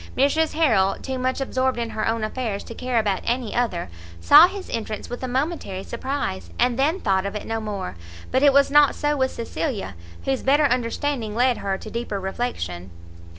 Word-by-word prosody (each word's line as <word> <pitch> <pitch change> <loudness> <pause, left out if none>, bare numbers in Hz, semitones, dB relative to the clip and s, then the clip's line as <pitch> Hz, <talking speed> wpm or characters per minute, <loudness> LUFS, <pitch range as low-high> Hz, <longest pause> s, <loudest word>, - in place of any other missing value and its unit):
Mrs 300 +4 +2
Harrel, 220 -12 +3
too 260 -1 -4
much 255 +1 -1
absorbed 260 -1 0
in 230 -1 -3
her 215 - -2
own 225 0 0
affairs 215 -2 -3
to - - -9
care 250 0 -2
about 205 -4 +1
any 240 -2 -1
other, 230 - -1 0.3
saw 300 - +8
his 390 0 -7
entrance 220 -1 -5
with 245 - -5
a 255 - -3
momentary 255 - -2
surprise, 235 - -4
and 250 0 +1
then 310 +7 +2
thought 190 - +1
of 200 +1 -4
it 210 - -5
no 225 0 -2
more; 200 - -4 0.4
but 260 - +2
it 285 -1 +6
was 280 0 +4
not 295 -1 +5
so 295 0 0
with 260 -2 +1
Cecilia, 230 - -4 0.3
whose 270 -1 0
better 290 +3 +4
understanding 245 -2 -1
led 245 +1 +3
her 195 -1 -2
to 215 - -10
deeper 230 -4 -3
reflection. 95 - -4
245 Hz, 195 wpm, -23 LUFS, 210-270 Hz, 0.4 s, saw